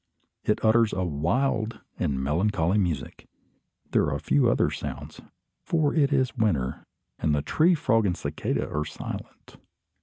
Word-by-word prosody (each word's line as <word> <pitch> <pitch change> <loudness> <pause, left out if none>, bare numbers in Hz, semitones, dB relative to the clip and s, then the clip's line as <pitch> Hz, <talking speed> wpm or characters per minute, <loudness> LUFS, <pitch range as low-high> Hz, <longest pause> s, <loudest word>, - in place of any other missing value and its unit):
It 105 - +1
utters 115 0 +4
a 95 - -1
wild 110 - 0 0.2
and 65 -2 0
melancholy 85 +6 +1
music. 85 -5 -3 0.6
There - - +3
are - - -1
few 70 +2 +2
other - - +2
sounds, - - -6 0.4
for 155 -4 +1
it 145 -3 +3
is 130 -2 +1
winter, 85 - -1 0.3
and 75 -1 +1
the 70 - -1
tree 170 +3 +3
frog 115 -9 +2
and 90 - -1
cicada - - -2
are 75 +1 -2
silent. 75 - -8
105 Hz, 145 wpm, -26 LUFS, 80-130 Hz, 0.6 s, utters